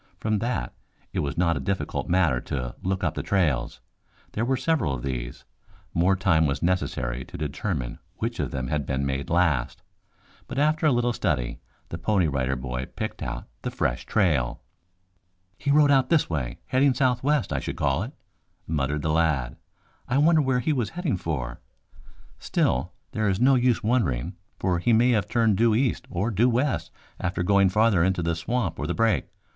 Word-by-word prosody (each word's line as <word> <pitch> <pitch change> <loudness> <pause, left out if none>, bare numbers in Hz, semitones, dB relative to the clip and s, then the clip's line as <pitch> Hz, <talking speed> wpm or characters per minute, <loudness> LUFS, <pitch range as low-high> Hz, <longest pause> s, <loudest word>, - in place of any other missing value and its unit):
From 110 -1 0
that, 115 - -2 0.4
it - - -1
was 75 +1 -2
not 85 -1 +2
a - - -2
difficult 100 -1 -2
matter 85 -8 +3
to 60 -3 -4
look 95 +1 -2
up - - +1
the - - -3
trails. 75 - 0 0.5
There 110 - -2
were 130 +2 +1
several 130 - +1
of - - -7
these. - - -5 0.5
More 90 +3 +3
time 90 -5 +3
was 70 - -2
necessary 65 -9 -1
to - - -9
determine 75 - -3 0.2
which - - -3
of - - -1
them 65 -2 -3
had 75 -2 -1
been 70 0 -1
made 70 +3 -2
last, 85 -7 +1 0.6
but - - -6
after 155 +2 +2
a - - +5
little 120 -1 +1
study 65 - -1 0.3
the 85 - -5
Pony 95 0 +2
Rider 65 -2 0
Boy 65 0 -4
picked - - -5
out - - -5
the - - -3
fresh 60 +1 -2
trail. 70 -11 +1 0.9
"He 140 - -4
rode 145 0 +5
out 135 -2 +4
this 165 -3 +3
way, 65 -7 -3
heading 130 0 +3
southwest, 130 +1 +1
I - - 0
should - - -5
call 70 +2 +1
it," 115 +6 -4 0.5
muttered 75 -1 -1
the 80 - +1
lad. 75 -6 +1 0.5
"I 130 - +1
wonder 155 +2 +5
where 130 -3 +1
he 155 - +1
was 120 -6 -1
heading 175 - -2
for? 65 -8 -4 0.8
Still, - - 0 0.2
there 110 -1 0
is 95 0 0
no 130 +3 +5
use 125 -2 +2
wondering, 95 - 0 0.2
for 90 -3 0
he 115 +7 +2
may 120 +3 +5
have 105 -4 +1
turned 115 -4 +2
due 115 -1 +4
east 125 +2 0
or 100 +7 -1
due 115 +5 +3
west 130 +4 0 0.3
after 90 -1 -1
going 100 +1 +4
farther 105 -3 +3
into 95 -1 +1
the 85 0 +1
swamp 85 +1 -2
or 75 - -2
the 85 - -1
brake. 115 -2 +2
95 Hz, 185 wpm, -25 LUFS, -, 0.9 s, a